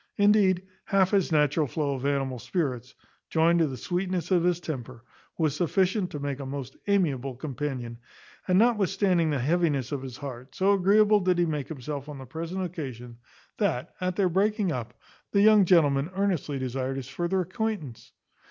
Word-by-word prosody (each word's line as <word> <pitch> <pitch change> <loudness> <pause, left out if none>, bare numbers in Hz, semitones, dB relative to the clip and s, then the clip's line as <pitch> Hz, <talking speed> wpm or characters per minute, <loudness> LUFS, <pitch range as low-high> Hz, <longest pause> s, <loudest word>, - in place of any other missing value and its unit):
Indeed, 205 -3 +4 0.2
half 190 -1 +2
his 195 -4 +2
natural 150 0 +2
flow 145 +1 -1
of 135 +1 -3
animal 135 -3 -1
spirits, 130 -6 -3 0.3
joined 170 +1 +3
to 165 - +3
the 130 -2 -5
sweetness 180 +2 -2
of 175 -2 +4
his 175 -1 +2
temper, 130 -7 -6 0.3
was 155 -4 +1
sufficient 185 +3 +1
to 150 - -6
make 140 -1 -3
a 140 - -5
most 135 -1 -6
amiable 140 -10 +1
companion; 130 -3 -5 0.5
and 185 -1 +3
notwithstanding 195 -6 +2
the 145 - 0
heaviness 145 -1 0
of 140 -2 -2
his 130 -2 -8
heart, 130 -2 -8
so 195 +2 +3
agreeable 205 +2 +4
did 180 -2 +1
he 175 - +3
make 150 -4 -3
himself 145 -1 -6
on 145 - -7
the 135 - -9
present 165 +7 -4
occasion, 130 - -7 0.4
that, 125 - -1
at 180 0 -1
their 195 -1 +2
breaking 195 +1 +1
up, 120 -5 -5 0.4
the 200 - +4
young 210 -2 +6
gentleman 150 -4 +3
earnestly 185 -8 0
desired 130 0 -3
his 130 -2 -6
further 175 +7 -1
acquaintance. 185 - -4
160 Hz, 170 wpm, -27 LUFS, 135-185 Hz, 0.5 s, young